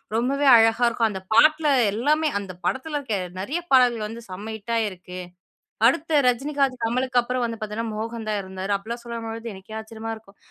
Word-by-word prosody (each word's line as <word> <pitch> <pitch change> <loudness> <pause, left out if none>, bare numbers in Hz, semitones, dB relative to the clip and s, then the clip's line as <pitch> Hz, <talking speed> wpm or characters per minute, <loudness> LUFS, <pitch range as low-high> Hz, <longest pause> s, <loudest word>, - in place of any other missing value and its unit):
ரொம்பவே 275 +5 +1
அழகா 225 +1 +4
இருக்கும் 230 -1 +1
அந்த 190 -2 -5
பாட்டுல 305 +5 +5 0.2
எல்லாமே 300 +8 +2
அந்த 195 -2 -7
படத்தில 295 +3 -1
இருக்க 230 -7 -2 0.2
நெறைய 275 - -2
பாடல்கள் 245 -4 +4
வந்து 230 +2 -8
செம்ம 205 +4 -6
ஹிட்டாயிருக்கு. 205 -5 -3 0.7
அடுத்த 295 +4 +2
ரஜினிகாந்த், 270 +1 +1
கமலுக்கு 250 +2 +1
அப்புறம் 250 0 -1
வந்து 230 -1 -5
பாத்தீங்கன்னா, 215 +1 -3
மோகன் 225 +1 -5
தான் 210 -1 0
இருந்தாரு." 190 +1 -4
அப்டீலாம் 230 +4 -7
சொல்லும்போது 230 -1 -5
எனக்கே 195 +3 -9
ஆச்சரியமா 220 0 -7
இருக்கும். 205 -2 -20
230 Hz, 160 wpm, -24 LUFS, 215-255 Hz, 0.7 s, பாட்டுல